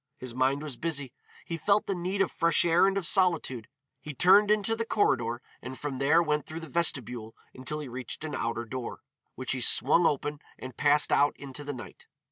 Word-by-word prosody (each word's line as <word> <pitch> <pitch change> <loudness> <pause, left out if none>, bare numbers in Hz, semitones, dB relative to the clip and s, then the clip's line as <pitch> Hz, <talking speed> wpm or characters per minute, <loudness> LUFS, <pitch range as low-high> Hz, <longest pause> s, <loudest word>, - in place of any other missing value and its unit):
His 125 -2 -7
mind 135 +3 +1
was 145 -5 -6
busy. 145 -5 -3 0.3
He 165 - -4
felt 200 +6 +2
the 200 - -1
need 185 +2 0
of - - -4
fresh 170 0 +3
air 175 +3 +4
and 195 0 0
of 195 - -2
solitude. 170 - +1 0.3
He 145 +1 -8
turned 200 +8 +6
into 210 +1 +2
the 230 - -2
corridor 120 - 0 0.2
and 130 +1 -8
from 140 -3 -5
there 145 +5 +4
went 150 -3 -1
through 160 +1 -7
the 160 - -9
vestibule 125 -8 0 0.2
until 130 +4 -4
he 145 - -7
reached 125 +3 -7
an 155 -2 -5
outer 115 -2 -2
door, 125 +1 -6 0.3
which 130 - -3
he 130 - -1
swung 155 +8 +4
open 145 0 -2 0.2
and 130 -2 -9
passed 145 0 +3
out 145 - +3
into 140 +1 -8
the 145 - -4
night. 125 - -11
145 Hz, 205 wpm, -28 LUFS, 130-170 Hz, 0.3 s, turned